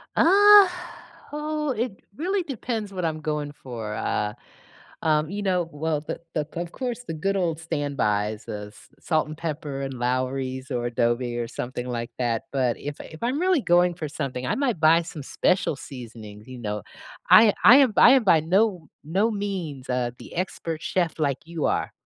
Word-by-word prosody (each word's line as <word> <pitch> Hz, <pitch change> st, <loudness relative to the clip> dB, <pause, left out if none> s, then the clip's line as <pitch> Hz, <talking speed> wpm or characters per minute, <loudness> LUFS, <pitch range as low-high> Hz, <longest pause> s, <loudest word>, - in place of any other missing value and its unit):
Uh, 405 Hz, +3 st, +8 dB, 0.6 s
oh, 300 Hz, 0 st, -2 dB
it 225 Hz, -3 st, -3 dB, 0.2 s
really 370 Hz, -, -1 dB
depends 230 Hz, -8 st, -4 dB
what 185 Hz, -2 st, -4 dB
I'm 160 Hz, -1 st, -1 dB
going 150 Hz, -1 st, -3 dB
for, 115 Hz, -7 st, -7 dB
uh, 105 Hz, -1 st, -1 dB, 0.7 s
um, 155 Hz, -1 st, +1 dB
you 205 Hz, +2 st, -4 dB
know. 180 Hz, -4 st, 0 dB
Well, 155 Hz, +1 st, -1 dB
the 150 Hz, -, -6 dB
the 150 Hz, -2 st, -1 dB
of 170 Hz, 0 st, -4 dB
course, 250 Hz, -2 st, -4 dB
the 165 Hz, -, -5 dB
good 195 Hz, +6 st, -1 dB
old 170 Hz, -4 st, 0 dB
standbys, 110 Hz, -10 st, -1 dB
the 105 Hz, -1 st, -6 dB
s 105 Hz, -, -17 dB
salt 155 Hz, -2 st, +1 dB
and 155 Hz, 0 st, -8 dB
pepper 150 Hz, -4 st, -4 dB
and 135 Hz, -1 st, -4 dB
Lawry's 130 Hz, +2 st, -2 dB
or 120 Hz, -1 st, -1 dB
adobe 120 Hz, 0 st, 0 dB
or 120 Hz, -1 st, -3 dB
something 125 Hz, +1 st, -5 dB
like 120 Hz, -1 st, -4 dB
that, 120 Hz, -1 st, 0 dB
but 125 Hz, -3 st, +1 dB
if 145 Hz, 0 st, -6 dB
I -, -, -11 dB
if 160 Hz, -, -12 dB
I'm 250 Hz, +4 st, 0 dB
really 365 Hz, -2 st, +3 dB
going 175 Hz, -2 st, +3 dB
for 155 Hz, -, -4 dB
something, 135 Hz, -4 st, -4 dB
I -, -, 0 dB
might 255 Hz, -, 0 dB
buy 160 Hz, +2 st, +5 dB
some 165 Hz, -3 st, -8 dB
special 180 Hz, +3 st, +1 dB
seasonings, 110 Hz, -6 st, -10 dB
you 130 Hz, -, -9 dB
know. 105 Hz, -4 st, -4 dB, 0.5 s
I 215 Hz, -1 st, +8 dB
I 245 Hz, +5 st, +10 dB
am 270 Hz, -5 st, +5 dB
I 250 Hz, -, +8 dB
am 265 Hz, -3 st, +5 dB
by 175 Hz, -6 st, +5 dB
no 180 Hz, +1 st, +1 dB, 0.2 s
no 190 Hz, +9 st, +1 dB
means, 185 Hz, -11 st, -4 dB
uh, 125 Hz, -1 st, 0 dB
the -, -, -11 dB
expert 170 Hz, -3 st, -3 dB
chef 170 Hz, -3 st, -1 dB
like 140 Hz, -3 st, 0 dB
you 165 Hz, -2 st, -3 dB
are, -, -, 0 dB
155 Hz, 185 wpm, -25 LUFS, 125-195 Hz, 0.7 s, I